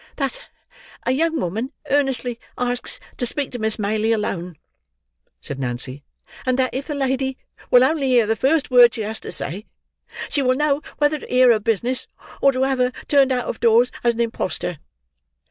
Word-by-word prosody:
"That 275 -3 -4 0.6
a - - +2
young 320 +4 +1
woman 225 - -3 0.2
earnestly 260 -4 +1 0.2
asks 245 0 -1 0.2
to 245 - 0
speak 285 +2 -3
to 245 - -5
Miss 220 0 0
Maylie 215 +1 +1
alone," 180 -6 -3 0.8
said 140 - -6
Nancy; 130 +2 -3 0.4
"and 255 -1 +1
that 260 -1 +1
if 270 +2 -4
the 300 - -3
lady 265 -1 -1 0.3
will 250 0 +7
only 280 0 +1
hear 245 -3 +4
the 225 +1 +1
first 275 +5 +1
word 245 -2 +7
she 225 - -4
has 220 +1 -2
to - - -7
say, 200 +6 -5 0.6
she 285 - 0
will 255 -1 +2
know 295 0 +1 0.2
whether 295 +1 +2
to - - -11
hear 250 -1 +5
her 220 - +3
business, 230 +4 -1 0.3
or 275 - +6
to 260 0 0
have 265 -1 0
her 250 0 +2 0.2
turned 275 -2 +4
out 250 -1 0
of - - -4
doors 235 +1 +4
as 235 -1 +2
an 235 - -1
impostor." 185 -7 -2
250 Hz, 185 wpm, -21 LUFS, 220-270 Hz, 0.8 s, will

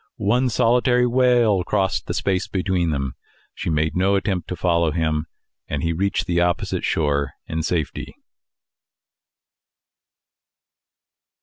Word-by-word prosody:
One 125 +6 +1
solitary 125 +3 +3
wail 120 -6 +3
crossed 95 0 -1
the - - -3
space 95 -2 0
between. 85 -8 -1 0.4
She - - -4
made 80 -1 0
no 95 +2 +2
attempt 95 -3 -1
to 90 - -4
follow 85 -2 +1
him, 80 -1 -1 0.4
and - - -3
he 85 0 0
reached 100 +4 -1
the 85 -2 +1
opposite 90 -1 0
shore 70 -3 0
in 80 0 -3
safety. 80 -2 -3
90 Hz, 115 wpm, -22 LUFS, 80-100 Hz, 0.4 s, solitary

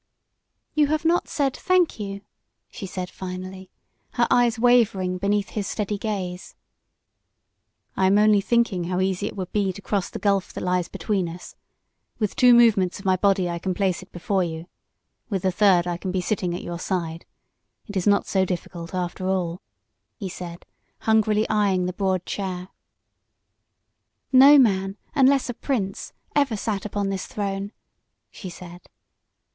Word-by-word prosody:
"You 300 -1 +3
have 310 +2 -1
not 345 +2 +2
said, 275 -3 0
'Thank 365 -8 +1
you,'" 200 -1 -5 0.5
she 195 - -7
said, 180 -1 -5
finally, 185 0 -7 0.4
her 240 - +2
eyes 240 -2 +3
wavering 225 -7 +3
beneath 200 +1 0
his 205 -2 -3
steady 210 -1 -3
gaze. 190 -4 -4 1.4
"I 190 - +3
am 195 +2 +4
only 210 -1 +5
thinking 210 -5 +1
how 180 +1 -1
easy 190 +1 0
it - - -7
would 185 -3 -5
be 200 -2 +1
to 185 - -10
cross 200 -1 -2
the - - -6
gulf 200 -2 0
that - - -5
lies 180 -1 0
between 190 -4 -2
us. 175 +2 -10 0.6
With 210 -3 -2
two 250 -1 +6
movements 215 -6 +4
of 200 - -12
my 185 -1 +4
body 190 -1 +2
I 170 0 -3
can 185 +1 -2
place 190 -2 0
it 185 - -15
before 185 +2 0
you, 165 -1 -5 0.6
with 195 -4 -2
a 185 - +3
third 180 -2 +4
I 175 -1 -2
can 185 +1 -4
be 185 - 0
sitting 180 -2 -1
at - - -6
your 170 -1 -5
side. 170 -3 -3 0.6
It 205 - -9
is 190 0 0
not 200 0 +4
so 190 -1 +1
difficult 175 -1 -5
after 180 +1 -3
all," 180 -2 -1 0.6
he 195 -4 -5
said, 175 -1 -8 0.4
hungrily 215 -1 +2
eyeing 200 -4 +1
the 180 - -2
broad 185 -1 -1
chair. 185 -2 -4 1.6
"No 275 +3 +8
man, 195 -6 +2 0.2
unless 275 -1 +4
a 245 - -3
prince, 215 -7 -3 0.2
ever 275 -7 +2
sat 205 -2 -3
upon 205 -1 -2
this 195 -1 -3
throne," 200 -1 -3 0.6
she 185 - -8
said. 175 0 -12
195 Hz, 165 wpm, -24 LUFS, 180-215 Hz, 1.6 s, No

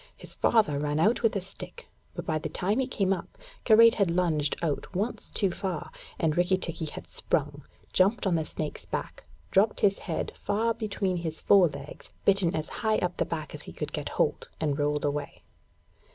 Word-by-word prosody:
His - - -8
father 205 -12 +3
ran 150 +1 -1
out 215 +8 +3
with 225 -3 +2
a 200 - 0
stick, 195 - -10 0.3
but - - -5
by 155 -1 0
the - - -4
time 200 +6 0
he 260 - +1
came 195 -7 +1
up, 190 - -7 0.3
Karait 230 0 +8
had 200 -4 +2
lunged 165 -4 +1
out 160 +4 -2
once 205 +6 -2
too 195 -3 0
far, 175 -3 -4 0.3
and 155 -2 +1
Rikki 180 +2 +3
tikki 165 -3 -4
had 155 - -7
sprung, - - -2 0.3
jumped 200 +6 +3
on 190 - +2
the 160 -1 +1
snake's 155 0 -5
back, - - -5 0.3
dropped 205 +3 +3
his 195 -1 +3
head 160 - -2
far 225 +3 0
between 205 -4 -2
his 160 -2 -4
fore 195 -3 +6
legs, 140 -1 -9
bitten 195 -4 +4
as 155 -1 -2
high 220 -1 +2
up 180 0 -1
the - - +1
back 155 -2 -5
as - - -7
he - - -10
could - - -5
get - - -3
hold, - - 0
and 150 -2 0
rolled 150 0 +1
away. 145 0 -3
180 Hz, 195 wpm, -28 LUFS, 155-205 Hz, 0.3 s, Karait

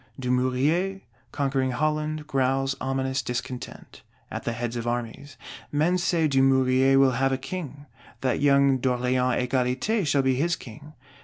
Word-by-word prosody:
Dumouriez, 130 +10 0 0.3
conquering 135 -2 -1
Holland, 155 +2 -1
growls 135 -1 0
ominous 130 0 -1
discontent, 125 +1 -6 0.3
at - - -6
the 115 - -1
head 120 0 -4
of 120 0 -4
Armies. 120 +4 -4 0.3
Men 160 +5 +1
say 170 -2 +1
Dumouriez 135 -1 +3
will 135 -1 +5
have 135 0 +2
a 130 - 0
King; 145 0 -7 0.4
that 130 -1 0
young 140 -2 +4
D'Orléans 125 0 0
Égalité 130 - 0
shall 140 -1 +2
be 130 0 +2
his 165 +7 0
King. 145 +6 -12
135 Hz, 140 wpm, -25 LUFS, 125-145 Hz, 0.4 s, will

